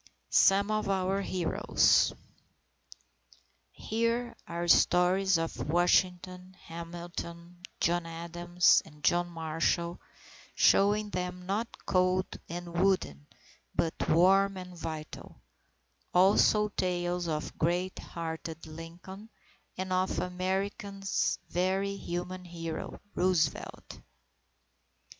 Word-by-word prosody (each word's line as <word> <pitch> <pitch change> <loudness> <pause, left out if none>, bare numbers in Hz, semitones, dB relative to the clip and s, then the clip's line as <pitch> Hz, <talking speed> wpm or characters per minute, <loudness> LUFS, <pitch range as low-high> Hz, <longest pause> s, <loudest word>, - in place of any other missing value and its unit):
SOME 200 +2 +4
OF 215 -1 -1
OUR 190 0 0
HEROES 180 -3 +2 1.6
Here 230 +2 -1
are 170 0 -3
stories 180 +2 +4
of 165 -2 -4
Washington, 180 +2 +1
Hamilton, 170 +1 -8 0.2
John 175 0 +1
Adams, 175 +1 +2
and 150 -2 -17
John 175 0 +2
Marshall 165 +1 -1 0.5
showing 205 +1 +4
them 180 0 -4
not 205 +5 -1 0.2
cold 185 0 +2 0.2
and 170 0 -5
wooden, 75 - 0 0.5
but 165 - +1 0.2
warm 195 +4 +4
and 180 -1 -8
vital; 160 -2 -7 0.8
also 205 +3 +5
tales 175 -2 -1
of 155 -1 -3
great 175 +3 0
hearted 165 -1 -6
Lincoln, 170 +6 -10 0.5
and 185 0 -3
of 185 +1 0
America's 195 +2 -1
very 190 +2 0
human 180 0 -5
hero, 165 -2 -6
Roosevelt. 175 -4 -1
180 Hz, 90 wpm, -30 LUFS, 170-190 Hz, 1.6 s, also